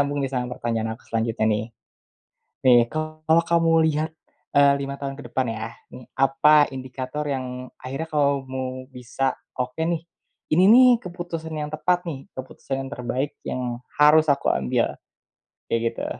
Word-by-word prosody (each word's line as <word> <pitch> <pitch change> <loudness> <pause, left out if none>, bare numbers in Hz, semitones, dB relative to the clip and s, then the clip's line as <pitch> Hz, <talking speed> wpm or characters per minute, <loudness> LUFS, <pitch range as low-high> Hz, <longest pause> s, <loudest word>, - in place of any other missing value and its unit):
nyambung 140 0 0
nih 135 - -2
sama 125 -2 -2
pertanyaan 115 -1 -2
aku 115 - -19
selanjutnya 115 -1 0
nih, 105 +1 -2 1.0
nih 120 -2 +8
kalau 155 +1 +1
kamu 165 -1 +3
lihat, 155 +1 0 0.5
eee, 140 0 +7
5 140 0 -4
tahun 135 -1 -4
ke - - -8
depan 130 -2 0
ya 110 +1 -5 0.2
nih 125 - -10
apa 145 +2 +5
indikator 130 +2 -5
yang 125 -1 -4
akhirnya 135 +5 -5
kamu 130 -3 -1
bisa 130 +1 -2 0.2
oke 125 +2 -4
nih, 165 0 0 0.5
ini 180 +4 +5
nih 255 +1 +8 0.2
keputusan 170 -2 -6
yang 150 -1 -4
tepat 175 +3 0
nih 135 -4 -6
keputusan 130 +1 -6
yang - - -9
terbaik 125 +3 -2
yang 130 - -2 0.4
harus 155 +2 +6
aku 140 -1 +2
ambil, 65 -2 0 0.7
kayak 115 - 0
gitu. - - -4
135 Hz, 150 wpm, -24 LUFS, 125-155 Hz, 1.0 s, nih